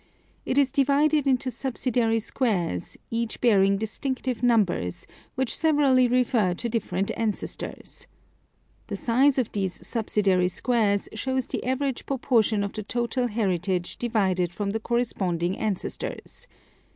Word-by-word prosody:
It 260 - 0
is 280 -2 +4
divided 285 +1 +3
into 260 -1 +1
subsidiary 240 -3 0
squares, 200 - -1
each 230 -1 -2
bearing 200 -4 +4
distinctive 255 +3 -3
numbers, 205 - +1 0.3
which 265 -2 0
severally 285 -5 +4
refer 240 -7 +2
to 235 - -3
dif 230 0 -2
ferent 185 +2 -1
ancestors. 220 -2 -4 0.8
The - - -4
size 260 +4 +3
of 250 -4 0
these 190 -3 -3
subsidiary 200 -5 +1
squares 205 +1 +1
shows 260 +3 -1
the - - -4
average 260 +1 -2
proportion 230 -6 +2
of 200 - -4
the 215 - -4
total 240 +3 -1
heritage 185 -5 -1
derived 190 -7 +1
from 205 -1 -2
the 220 - -2
corresponding 190 -7 -1
ancestors. 210 -4 -4
230 Hz, 125 wpm, -26 LUFS, 200-255 Hz, 0.8 s, is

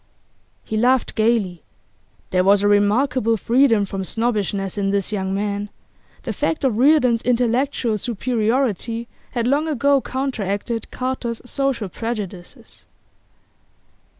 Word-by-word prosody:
He 220 - -3
laughed 250 +3 +2
gaily. 215 -7 +1 0.7
There 185 0 +3
was 200 +1 +4
a - - +4
remarkable 225 +3 +2
freedom 230 -2 +3
from 195 0 -4
snobbishness 205 -3 -1
in 200 -1 0
this 200 0 0
young 190 -2 -2
man; 205 +1 -2 0.5
the - - -3
fact 320 - -1
of 240 -5 +1
Reardon's 255 -4 +4
intellectual 245 -1 +1
superiority 230 0 -1 0.3
had 235 -2 -1
long 285 +5 +1
ago 280 -1 +2
counteracted 230 -4 -3
Carter's 255 -2 -3
social 265 -4 -1
prejudices. 200 -3 -7
230 Hz, 115 wpm, -21 LUFS, 205-255 Hz, 0.7 s, was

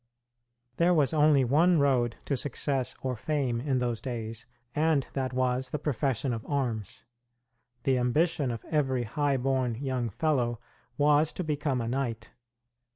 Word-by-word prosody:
There 175 +1 +4
was 150 -1 +3
only 150 -3 +4
one 165 +8 +4
road 130 -5 +2
to 140 - 0
success 135 0 -1
or 130 -1 -1
fame 130 -2 -1
in 135 -1 0
those 120 -3 -1
days, 115 -2 -5 0.3
and 155 -2 +2
that 130 -2 -2
was 130 0 0
the 150 - -2
profession 135 -3 -1
of 110 -1 -5
arms. 120 -8 -2 0.8
The 130 -2 +2
ambition 145 +3 +1
of 115 -2 -5
every 135 -5 0
high 140 +4 0
born 130 -2 0
young 130 -2 -2
fellow 120 - 0 0.4
was 150 +1 +4
to 185 - -3
become 145 -4 -1
a 115 - -3
knight. 120 -3 -3
130 Hz, 150 wpm, -28 LUFS, 120-145 Hz, 0.8 s, There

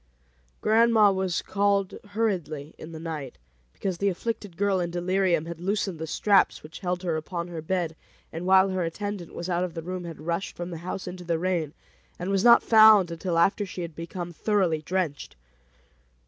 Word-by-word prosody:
Grandma 220 -1 +5
was 190 -2 -1
called 200 -1 +1 0.2
hurriedly 165 -9 -2
in 160 - -9
the 160 - -8
night, 155 -5 -6 0.3
because 185 - -4
the 200 - +2
afflicted 205 -1 -4
girl, 200 -1 +2
in 175 -1 -1
delirium, 175 -1 +1
had 170 -1 -7
loosened 195 -2 -1
the 160 - -4
straps 200 +5 +2
which 155 +2 -10
held 180 -1 -2
her 170 -3 0
upon 170 +2 -5
her 165 -2 -5
bed, 170 -1 -2 0.4
and 170 +3 -4
while 190 +1 +6
her 185 -1 -1
attendant 190 +1 -5
was 170 - -5
out 175 -1 0
of 180 -2 -4
the 165 - -5
room 180 +1 -5
had 165 -2 -8
rushed 170 +4 -3
from 175 +1 -5
the 165 - -6
house 185 +2 -5
into 180 0 -7
the 170 -1 0
rain, 170 -4 -1 0.4
and 180 +2 -3
was 195 0 +1
not 235 -1 +7
found 215 -5 +7
until 170 +1 -2
after 195 +5 +3
she 185 -2 -6
had 165 -2 -7
become 175 +1 -6
thoroughly 180 -5 +1
drenched. 165 - -3
180 Hz, 190 wpm, -26 LUFS, 165-195 Hz, 0.4 s, not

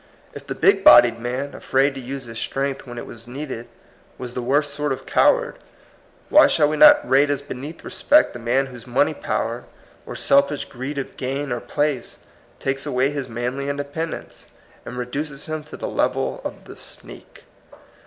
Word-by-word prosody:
If - - -10
the - - -4
big - - +3
bodied 120 -1 +8
man, 125 +4 -4
afraid 135 +1 +1
to 135 - -7
use 135 +2 -6
his 115 -2 -7
strength 135 0 -3
when 120 0 -8
it - - -6
was 115 0 -10
needed, 130 -2 -6 0.5
was 125 -1 -7
the 125 - -3
worst 140 +4 +1
sort 145 0 -2
of 135 - -4
coward, - - +2 0.7
why 305 - +7
shall 150 -2 +3
we 155 - -1
not 295 - +7
rate 140 +2 +4
as 145 -1 -1
beneath 145 +6 -8
respect 300 +1 +3
the 120 - -8
man 120 +4 +1
whose 125 -3 -11
money 120 - +2
power - - -3 0.4
or - - -6
self 140 +1 +4
ish 145 - -4
greed 135 +3 -6
of 135 - -5
gain 135 +2 -3
or 120 - -1
place 135 +1 -2 0.4
takes 135 +2 -2
away 135 0 +1
his 140 -3 -4
manly 125 +4 -3
independence, 145 +3 -5 0.4
and 125 - -7
reduces 140 +3 -4
him 155 -1 -4
to - - -10
the - - -4
level - - -1
of - - -7
the - - -11
sneak? - - -11
135 Hz, 185 wpm, -22 LUFS, 125-145 Hz, 0.7 s, bodied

